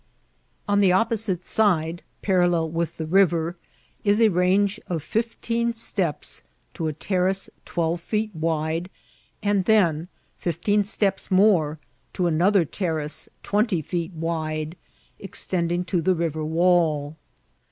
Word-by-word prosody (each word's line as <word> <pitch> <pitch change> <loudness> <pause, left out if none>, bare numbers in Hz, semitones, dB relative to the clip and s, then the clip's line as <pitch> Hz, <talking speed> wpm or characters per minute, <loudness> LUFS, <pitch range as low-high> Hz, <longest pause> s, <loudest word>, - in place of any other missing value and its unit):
On 205 0 +3
the 195 -2 +5
opposite 200 -2 +1
side, 175 -6 +2 0.2
parallel 175 -4 +2
with 165 0 -2
the 160 - -3
river, 170 -1 +2 0.5
is 205 +1 +3
a 225 -1 +6
range 190 +3 +2
of 165 -4 -3
fifteen 230 +3 -1
steps 190 -8 -1 0.3
to 165 - -3
a 155 - -2
terrace 190 +4 0
twelve 170 0 -1
feet 215 +2 -2
wide, 160 +1 -1 0.5
and 200 -2 +1
then 175 -7 +3 0.3
fifteen 190 +5 +1
steps 195 -1 -1
more 185 -6 +4 0.4
to 180 - 0
another 175 +3 +3
terrace 155 -3 -3
twmity 205 - +1
feet 175 0 -3
wide, 160 -1 -3 0.4
extending 175 -2 -2
to 175 -1 0
the 185 +3 +2
river 160 -2 -2
wall. 160 -2 +2
175 Hz, 120 wpm, -24 LUFS, 160-200 Hz, 0.5 s, a